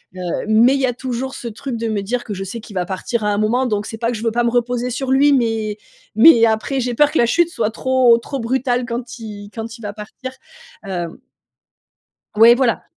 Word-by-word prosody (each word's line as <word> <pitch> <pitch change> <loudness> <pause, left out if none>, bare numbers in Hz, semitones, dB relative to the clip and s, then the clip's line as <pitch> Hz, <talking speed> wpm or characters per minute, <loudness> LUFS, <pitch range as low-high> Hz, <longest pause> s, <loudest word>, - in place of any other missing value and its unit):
Heu, - - -9 0.3
mais, 230 +4 +5
il 275 - -1
y - - +3
a 250 - 0
toujours 255 +1 -4
ce 240 - -7
truc 240 +2 -5
de 230 0 -3
me 215 -2 -1
dire 240 +5 -3
que 215 - -5
je 195 0 -5
sais 195 +5 -6
qu'il 215 -1 -12
va 180 -1 -1
partir 195 +5 -3
à 210 - +1
un 205 - 0
moment. 230 +5 +1
Donc, 210 -4 -1
c'est 225 - -7
pas 230 +1 -1
que 235 - -4
je 215 - -7
veux 230 - +1
pas 240 +2 0
me 235 - +1
reposer 245 0 0
sur 255 +2 -4
lui, 280 +2 +4
mais 225 -5 0 0.4
mais, 235 -8 +7
après, 220 +4 -1
j'ai 245 -1 -2
peur 295 +4 +4
que - - -1
la 235 - +4
chute 340 +7 +2
soit 225 -10 -1
trop, 255 0 +3
trop 270 +4 -6
brutale 245 +1 -1
quand 240 +1 -6
il 205 -2 -9
quand 225 0 -7
il - - -16
va 205 -2 -5
partir, 215 +5 -8 0.5
hem 175 -4 -5 1.2
Ouais, 230 +2 +8
voilà. 245 -2 0
235 Hz, 240 wpm, -19 LUFS, 215-255 Hz, 1.2 s, Ouais